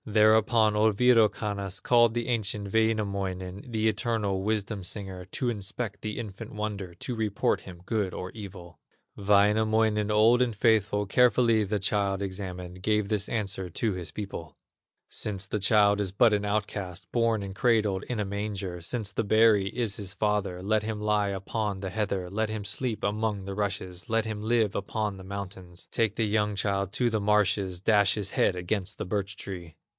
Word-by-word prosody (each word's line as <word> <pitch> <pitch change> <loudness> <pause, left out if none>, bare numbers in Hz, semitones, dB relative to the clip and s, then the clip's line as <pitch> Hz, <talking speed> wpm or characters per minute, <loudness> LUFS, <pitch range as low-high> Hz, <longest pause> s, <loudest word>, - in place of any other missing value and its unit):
Thereupon 110 0 +4
old 105 -1 +3
Wirokannas 105 -5 +2
Called 120 -2 +4
the 120 -1 -1
ancient 105 -4 -1
Wainamoinen, 100 -3 -1
The 110 -1 +1
eternal 105 -3 0
wisdom 105 -1 -2
singer, 95 -1 -5
To 120 +6 -2
inspect 105 0 -4
the 105 -1 -4
infant 110 -2 -7
wonder, 105 -4 -4
To 125 - -5
report 110 -2 0
him 90 -2 -12
good 105 -4 -1
or 90 +1 -6
evil. 95 -5 -10 0.4
Wainamoinen, 105 +1 +3
old 110 +4 +5
and 120 -3 +1
faithful, 105 -2 +2
Carefully 115 +1 +4
the 105 +2 -1
child 100 0 0
examined, 90 -2 -6
Gave 105 0 +1
this 105 -1 -1
answer 100 -4 -2
to 105 +5 -1
his 90 -4 -5
people: 85 -8 -7 0.5
"Since 100 -2 -3
the 105 +2 -2
child 100 0 +4
is 95 -2 -1
but 110 +3 +4
an 105 0 +1
outcast, 100 -3 -3
Born 115 -3 +1
and 95 -1 -6
cradled 105 -3 +2
in 120 -3 -3
a 105 - 0
manger, 100 -3 -4
Since 105 +3 -2
the - - -1
berry 110 -2 +4
is 115 -3 -2
his 95 -3 -6
father; 100 -4 -1
Let 110 +2 +2
him 110 0 -4
lie 105 -1 +1
upon 100 +1 -3
the 95 -1 -4
heather, 100 -3 -1
Let 110 +4 -1
him 110 -2 -4
sleep 110 +3 -2
among 105 -1 -1
the 100 - -4
rushes, 95 -1 -4
Let 115 0 +1
him 110 -2 -4
live 110 -2 +2
upon 105 0 -2
the 95 - -10
mountains; 95 -2 -7
Take 110 -3 +1
the 115 - +1
young 105 0 +1
child 100 -1 -1
to 120 0 +1
the 110 -1 0
marshes, 100 -3 +2
Dash 100 0 +3
his 100 -3 -3
head 90 - +2
against 90 +2 -2
the - - -4
birch 100 +1 -2
tree." 90 -6 -7
105 Hz, 175 wpm, -28 LUFS, 95-110 Hz, 0.5 s, old